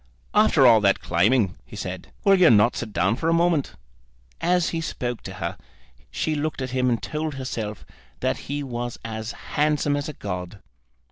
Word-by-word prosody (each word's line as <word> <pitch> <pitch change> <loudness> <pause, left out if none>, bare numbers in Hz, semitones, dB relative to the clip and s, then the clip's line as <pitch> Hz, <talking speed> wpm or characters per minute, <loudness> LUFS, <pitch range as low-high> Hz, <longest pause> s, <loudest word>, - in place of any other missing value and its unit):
"After 210 -10 +5
all 115 -3 +7
that 100 -1 +3
climbing," 95 +3 +2
he - - -12
said, 90 -1 -6
"will 195 - +5
you 185 -3 +6
not 105 +1 +5
sit 115 -2 -4
down 95 +3 +1
for 160 +6 -1
a - - +3
moment?" 165 -4 +2 0.7
As 180 0 +2
he 165 - -2
spoke 125 -7 -4
to - - -8
her - - -4 0.5
she 155 - -1
looked 150 0 -2
at 130 -1 -4
him 130 0 +1
and 120 -2 +1
told 155 -1 -4
herself 115 -6 -5 0.3
that - - 0
he 145 0 -2
was 120 -2 -4
as 110 0 -4 0.2
handsome 150 -1 +2
as 145 +1 -3
a - - -6
god. 90 -3 -6
130 Hz, 185 wpm, -24 LUFS, 110-155 Hz, 0.7 s, all